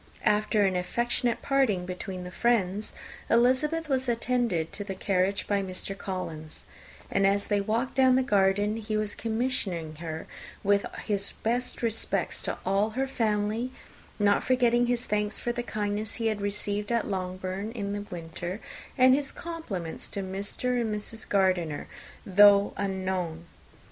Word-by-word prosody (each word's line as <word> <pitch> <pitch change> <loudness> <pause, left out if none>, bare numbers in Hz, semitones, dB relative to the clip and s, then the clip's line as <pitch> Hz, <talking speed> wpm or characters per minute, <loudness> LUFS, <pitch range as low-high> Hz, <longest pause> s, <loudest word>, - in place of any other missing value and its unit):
After 210 0 +3
an 190 -1 +1
affectionate 235 +6 0
parting 255 -10 +2
between 180 0 -5
the 180 - -7
friends, 210 -2 +1 0.4
Elizabeth 260 +7 +3
was 260 -3 0
attended 235 -8 0
to 205 - -3
the 195 -1 -5
carriage 190 +1 +1
by 200 -1 +1
Mr. 190 +1 -4
Collins; 170 -6 -6 0.5
and 195 0 +3
as 200 +1 +2
they 205 -1 +1
walked 225 +5 -1
down 260 -1 +5
the 260 - +3
garden, 205 -1 +2
he 215 -1 -2
was 215 -1 -1
commissioning 215 -9 -2
her 160 -1 -5 0.4
with 200 0 +3 0.2
his 200 -2 -1
best 245 +2 -1
respects 225 -1 0
to - - -3
all 195 +3 +2
her 270 - +2
family, 220 -1 0 0.5
not 205 -1 +3
forgetting 245 -1 +3
his 245 0 0
thanks 210 0 -1
for 240 - -1
the 240 0 -2
kindness 210 -1 -2
he 230 - -3
had 215 -2 0
received 205 +1 -2
at 235 -1 +2
Longbourn 185 +2 -3
in 200 -4 -3
the 205 - -3
winter, 175 +3 -5 0.4
and 255 0 +7
his 275 +1 0
compliments 225 - -4
to 200 - -4
Mr. 200 +6 -1
and 220 -2 -1
Mrs. 220 +2 -6
Gardiner, 185 -6 +1 0.4
though 200 +1 +6
unknown. 185 -4 -2
205 Hz, 150 wpm, -28 LUFS, 190-235 Hz, 0.5 s, and